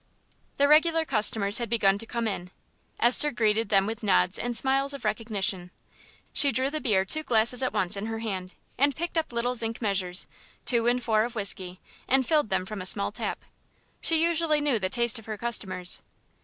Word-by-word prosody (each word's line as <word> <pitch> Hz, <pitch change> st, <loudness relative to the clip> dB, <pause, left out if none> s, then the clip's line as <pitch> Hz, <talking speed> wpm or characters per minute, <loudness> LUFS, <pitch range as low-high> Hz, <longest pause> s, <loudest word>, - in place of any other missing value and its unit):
The 285 Hz, -, +3 dB
regular 320 Hz, +2 st, +4 dB
customers 215 Hz, -4 st, +2 dB
had 235 Hz, -, -4 dB
begun 200 Hz, -4 st, +2 dB
to 225 Hz, -, -8 dB
come 235 Hz, -1 st, -3 dB
in. 180 Hz, -4 st, -4 dB, 0.5 s
Esther 250 Hz, +5 st, +4 dB
greeted 220 Hz, -4 st, 0 dB
them 195 Hz, -2 st, +3 dB
with 225 Hz, +2 st, -5 dB
nods 90 Hz, -, +2 dB
and 240 Hz, -1 st, -1 dB
smiles 275 Hz, +2 st, 0 dB
of 280 Hz, -, -10 dB
recognition. 200 Hz, -5 st, -3 dB, 0.6 s
She 280 Hz, -, +4 dB
drew 260 Hz, +3 st, -1 dB
the 310 Hz, 0 st, -3 dB
beer 190 Hz, -5 st, +1 dB
two 310 Hz, +11 st, +2 dB
glasses 240 Hz, -2 st, +3 dB
at 255 Hz, -, -1 dB
once 185 Hz, +2 st, +1 dB
in 200 Hz, +2 st, -5 dB
her 225 Hz, 0 st, -4 dB
hand, 195 Hz, -5 st, -5 dB, 0.2 s
and 280 Hz, 0 st, +2 dB
picked 345 Hz, +2 st, -4 dB
up 320 Hz, -4 st, -1 dB
little 240 Hz, +1 st, -1 dB
zinc 230 Hz, -1 st, +1 dB
measures, 190 Hz, -4 st, 0 dB, 0.4 s
two 240 Hz, -1 st, +2 dB
and 245 Hz, +1 st, +1 dB
four 220 Hz, -2 st, +2 dB
of 240 Hz, +1 st, -5 dB
whisky, 185 Hz, -3 st, -2 dB, 0.3 s
and 265 Hz, 0 st, +2 dB
filled 300 Hz, -6 st, +1 dB
them 185 Hz, -, -1 dB
from 210 Hz, 0 st, -7 dB
a -, -, -6 dB
small 200 Hz, +1 st, 0 dB
tap. 215 Hz, -, -5 dB, 0.6 s
She 325 Hz, -1 st, +3 dB
usually 330 Hz, -2 st, +1 dB
knew 290 Hz, -6 st, 0 dB
the 185 Hz, -2 st, -2 dB
taste 235 Hz, +2 st, +1 dB
of 225 Hz, -, -16 dB
her 215 Hz, -1 st, -5 dB
customers. 190 Hz, -6 st, -1 dB
230 Hz, 195 wpm, -26 LUFS, 200-265 Hz, 0.6 s, regular